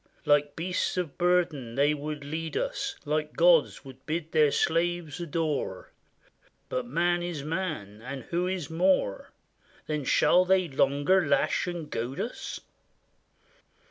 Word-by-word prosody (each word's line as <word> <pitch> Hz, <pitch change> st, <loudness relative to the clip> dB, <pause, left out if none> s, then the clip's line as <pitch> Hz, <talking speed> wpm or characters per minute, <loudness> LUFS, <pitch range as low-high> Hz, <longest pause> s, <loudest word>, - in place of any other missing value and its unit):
Like 145 Hz, 0 st, +3 dB
beasts 180 Hz, +2 st, -1 dB
of 175 Hz, -6 st, -2 dB
burden 170 Hz, -9 st, +1 dB
they 145 Hz, +2 st, +3 dB
would 150 Hz, 0 st, -5 dB
lead 160 Hz, +2 st, -4 dB
us, -, -, -2 dB
Like 150 Hz, +1 st, -1 dB
gods, 170 Hz, -5 st, +4 dB
would 130 Hz, 0 st, -12 dB
bid 160 Hz, +1 st, -3 dB
their 155 Hz, -2 st, +5 dB
slaves 170 Hz, -1 st, 0 dB
adore; 155 Hz, -, -2 dB, 0.8 s
But 125 Hz, -1 st, -2 dB
man 175 Hz, +6 st, +1 dB
is 175 Hz, -5 st, -4 dB
man, 150 Hz, -, -4 dB
and 130 Hz, +2 st, -6 dB
who 175 Hz, +6 st, -1 dB
is 185 Hz, -5 st, -3 dB
more? 170 Hz, -, +1 dB, 0.5 s
Then 150 Hz, -2 st, -2 dB
shall 180 Hz, +7 st, +4 dB
they 185 Hz, -1 st, +3 dB
longer 145 Hz, +5 st, +2 dB
lash 145 Hz, -, +1 dB
and 175 Hz, -3 st, -4 dB
goad 120 Hz, +2 st, -4 dB
us? 240 Hz, -, -4 dB
155 Hz, 135 wpm, -28 LUFS, 140-175 Hz, 0.8 s, their